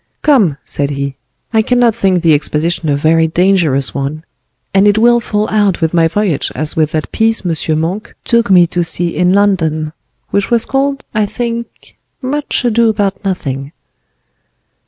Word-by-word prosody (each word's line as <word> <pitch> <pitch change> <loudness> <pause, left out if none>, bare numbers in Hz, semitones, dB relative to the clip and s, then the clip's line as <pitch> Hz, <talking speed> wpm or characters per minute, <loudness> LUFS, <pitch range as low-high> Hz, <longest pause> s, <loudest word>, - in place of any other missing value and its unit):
"Come," 220 - +3
said 140 -1 0
he, 140 -1 -4 0.4
"I 220 - +4
cannot 245 0 +2
think 190 -5 0
the 165 -2 +4
expedition 155 +2 0
a 145 - +2
very 160 +3 +2
dangerous 165 -6 +1
one; 140 +3 -4 0.5
and 195 +1 +4
it 205 +1 +3
will 240 +2 +4
fall 215 -2 -2
out 205 -4 +1
with 160 0 -1
my 165 -1 +3
voyage 175 -4 -1
as 155 0 -3
with 155 -1 0
that 155 -1 -3
piece 225 -2 +1
M. 160 -2 -1
Monk 180 +7 -4
took 235 -2 +1
me 180 -2 +6
to 175 +1 -2
see 170 0 -3
in 180 0 +2
London, 165 -6 +1 0.4
which 200 -1 0
was 235 -1 +2
called, 275 +1 -1
I 215 -1 +1
think, 235 +2 -6 0.2
'Much 285 -1 -2
Ado 230 -1 +3
about 205 -2 -1
Nothing. 140 -7 -4
185 Hz, 165 wpm, -14 LUFS, 155-220 Hz, 0.5 s, me